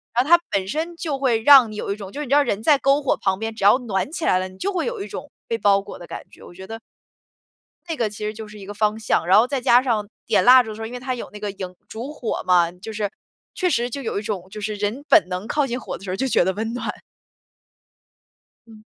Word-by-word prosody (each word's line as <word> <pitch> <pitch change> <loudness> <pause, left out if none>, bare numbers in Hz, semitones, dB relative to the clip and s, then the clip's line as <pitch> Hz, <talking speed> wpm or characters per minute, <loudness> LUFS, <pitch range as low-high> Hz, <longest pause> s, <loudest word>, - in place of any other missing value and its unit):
然 245 - +4
后 285 - -7
它 345 0 +8
本 190 -1 0
身 320 - -3
就 315 -4 -3
会 250 -5 +1
让 260 -3 +8
你 - - -8
有 210 - -4
一 - - -1
种 200 -2 -9
就 285 - -7
是 - - -3
你 - - -11
知 280 - +4
道 290 - +5
人 205 -5 -2
在 290 +5 +5
篝 275 +2 +2
火 275 - +1
旁 190 -1 0
边， 225 0 -4
只 210 - -6
要 205 +6 +6
暖 215 -1 -2
起 330 -1 -4
来 185 - +3
了， 185 - -2
你 185 0 -15
就 400 - -1
会 360 -4 -1
有 475 -3 -4
一 - - -5
种 - - -8 0.2
被 460 -1 -1
包 200 - +3
裹 200 - -10
的 175 - -10
感 - - -7
觉， - - -17
我 - - -13
觉 190 +1 -11
得 225 +2 -7 1.1
那 325 - -1
个 230 -7 0
其 210 0 -7
实 215 - -3
就 220 0 -8
是 210 0 -12
一 195 - -10
个 205 - -7
方 210 +1 0
向。 210 -6 0
然 190 +3 +5
后 230 - +5
再 275 0 -1
加 245 +1 +5
上 225 -5 -1 0.2
点 - - +2
蜡 255 +1 +8
烛 220 - -8
的 215 - -6
时 225 - -9
候， 220 - -4
因 245 - -10
为 250 - -5
它 255 0 -3
有 240 - -7
那 210 - -10
个 205 -1 -3
萤 185 -2 -7
烛 245 +6 -7
火 245 -7 -3
嘛， 175 -2 +4
就 185 +5 -9
是 210 -1 -2 0.5
确 365 -2 +1
实 245 -5 0
就 275 +3 -5
有 225 -5 -2
一 - - -5
种 200 -4 -4
就 210 +1 -8
是 215 +1 -3
人 205 +7 -3
本 330 - +6
能 185 +4 -4
靠 295 +2 +1
近 245 +1 -3
火 - - -6
的 - - -16
时 195 - -7
候 185 - -1
就 265 +7 -1
觉 245 - +3
得 190 - 0
温 220 +4 -3
暖。 245 - -3 1.7
嗯。 215 -1 -15
220 Hz, 315 characters per minute, -22 LUFS, 200-265 Hz, 1.7 s, 它